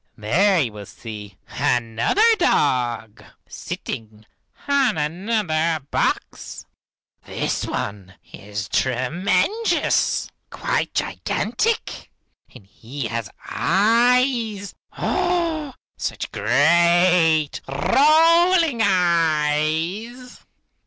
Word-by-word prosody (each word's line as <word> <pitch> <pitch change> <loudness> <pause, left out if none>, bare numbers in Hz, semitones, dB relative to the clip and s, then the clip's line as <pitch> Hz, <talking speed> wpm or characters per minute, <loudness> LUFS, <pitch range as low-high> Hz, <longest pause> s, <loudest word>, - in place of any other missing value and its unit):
There 175 - +2
you 120 -8 -1
will 105 -2 -10
see 105 -4 -10
another 120 - 0
dog, 120 - 0 0.2
sitting 110 -1 -7 0.4
on 275 - +2
another 165 0 -1
box. - - -3 0.6
This - - -3
one 100 -2 -5 0.2
is 105 0 -6
tremendous, 180 - 0 0.2
quite - - -2
gigantic, 455 0 -2 0.4
and 100 - -15
he 120 +6 -8
has 115 -2 -4 0.2
eyes, 230 +1 +1 0.2
oh! 335 -6 -1 0.2
such - - -4
great, 165 +3 +3
rolling 320 - +3
eyes! 170 +6 0
170 Hz, 70 wpm, -21 LUFS, -, 0.6 s, great